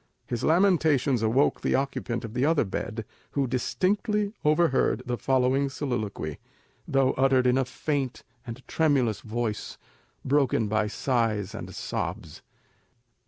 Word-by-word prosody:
His 120 -2 -4
lamentations 160 - +3
awoke 115 +6 +2
the - - +1
occupant 125 -4 -2
of 110 - -8
the 125 +2 0
other 155 +1 +3
bed, 110 +2 -4 0.3
who 140 -1 +1
distinctly 200 - 0
overheard 150 -6 +2
the 125 -1 -1
following 130 +2 +1
soliloquy, 110 - -3 0.5
though 135 -1 +3
uttered 130 -1 +3
in 125 0 +4
a 135 - +1
faint 135 0 -3 0.2
and 125 +1 -9
tremulous 135 -9 +2
voice, 110 -1 -3 0.5
broken 135 -5 +2
by 110 0 +1
sighs 110 -4 -1
and - - -7
sobs. - - -4
130 Hz, 125 wpm, -27 LUFS, 115-145 Hz, 0.5 s, in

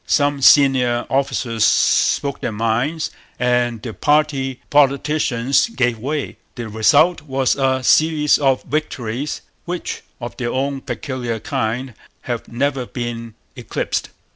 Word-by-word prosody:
Some 145 -1 +1
senior 130 -4 +5
officers 125 -4 0
spoke 140 +5 +2
their - - -2
minds, 115 +9 -1 0.3
and 120 -2 0
the 115 - -5
party 145 -3 +1
politicians 140 - +2
gave 125 - 0
way. 145 +4 -3 0.2
The 120 -3 -6
result 145 +11 +3
was 135 -3 0
a 130 -1 0
series 155 +1 +3
of 135 -3 +2
victories 140 -2 -3 0.2
which, 175 0 -4 0.2
of 120 -1 -7
their 120 -1 -2
own 135 +1 -2
peculiar 125 -6 -4
kind, 115 +4 -3 0.3
have 120 -2 -4
never 130 +1 -1
been 115 -2 -5 0.2
eclipsed. - - -3
130 Hz, 120 wpm, -19 LUFS, 120-145 Hz, 0.3 s, senior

